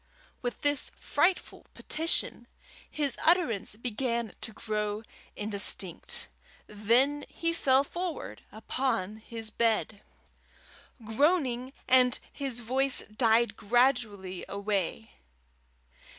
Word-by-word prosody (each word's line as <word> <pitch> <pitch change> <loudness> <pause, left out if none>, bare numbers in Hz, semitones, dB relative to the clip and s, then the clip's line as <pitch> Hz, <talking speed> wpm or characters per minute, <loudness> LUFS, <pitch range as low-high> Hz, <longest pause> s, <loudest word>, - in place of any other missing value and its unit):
With 245 -1 -4
this 290 -2 +1
frightful 360 +1 0
petition, 325 +2 +1 0.4
his 285 -4 -1
utterance 315 - +2
began 235 -1 -2
to 225 - -5
grow 210 0 -3 0.3
indistinct. 205 -3 -1 0.4
Then 240 +8 +2
he 335 0 -2
fell 270 -4 +3
forward 345 +3 -5
upon 220 -2 -2
the 225 -2 -3
bed, 220 -2 +1 1.0
groaning, 260 0 +1 0.2
and 250 -1 +5 0.2
his 265 -4 -1
voice 260 +3 +3
died 230 0 +3
gradually 215 -5 +1
away. 200 +1 -2
235 Hz, 90 wpm, -29 LUFS, 215-275 Hz, 1.0 s, and